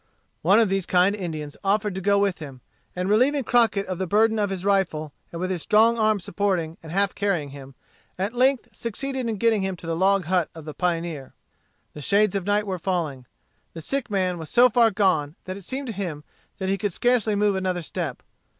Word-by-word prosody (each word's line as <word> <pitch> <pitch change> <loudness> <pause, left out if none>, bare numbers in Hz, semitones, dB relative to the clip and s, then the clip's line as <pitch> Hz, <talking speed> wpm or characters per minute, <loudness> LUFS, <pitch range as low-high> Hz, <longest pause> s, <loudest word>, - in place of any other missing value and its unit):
One 195 +7 +5
of 225 - +4
these 195 -1 -1
kind 185 +3 +3
Indians 155 -6 -5
offered 205 +1 +1
to 190 - -4
go 200 +2 +3
with 200 -3 +1
him; 135 -5 -9 0.3
and 180 +1 -2
relieving 260 +7 +3
Crockett 230 -4 +2
of 185 -1 -5
the 190 - -2
burden 220 +4 +3
of 205 -1 +1
his 190 -1 -4
rifle, 170 -7 0 0.2
and 170 - -6
with 185 +1 -2
his 180 -3 -2
strong 225 +4 +4
arm 215 -1 +3
supporting 175 -4 -1
and 160 - -10
half 195 +2 +1
carrying 185 -8 -1
him, 135 -1 -11 0.4
at 195 +5 -2
length 260 +1 +2
succeeded 255 +2 -4
in 220 - -1
getting 220 0 +2
him 190 -1 -2
to 170 - -12
the 165 0 -2
log 190 +1 +2
hut 180 -1 +1
of 160 -2 -10
the 155 - -6
pioneer. 165 -5 -3 0.6
The 150 - -9
shades 200 +6 +2
of 195 -1 -3
night 205 0 +2
were 190 -3 -3
falling. 160 -8 -2 0.5
The 165 - -7
sick 270 - -2
man 185 -3 0
was 160 - -7
so 250 +1 +5
far 230 0 +5
gone 185 -8 +1
that 185 - -5
it 200 - -10
seemed 270 +6 -4
to - - -3
him 175 -7 -5 0.3
that 190 - -3
he 195 +1 0
could 205 -4 -1
scarcely 235 -2 +2
move 205 0 +2
another 185 -2 -1
step. 160 -5 -5
190 Hz, 215 wpm, -24 LUFS, 170-210 Hz, 0.6 s, One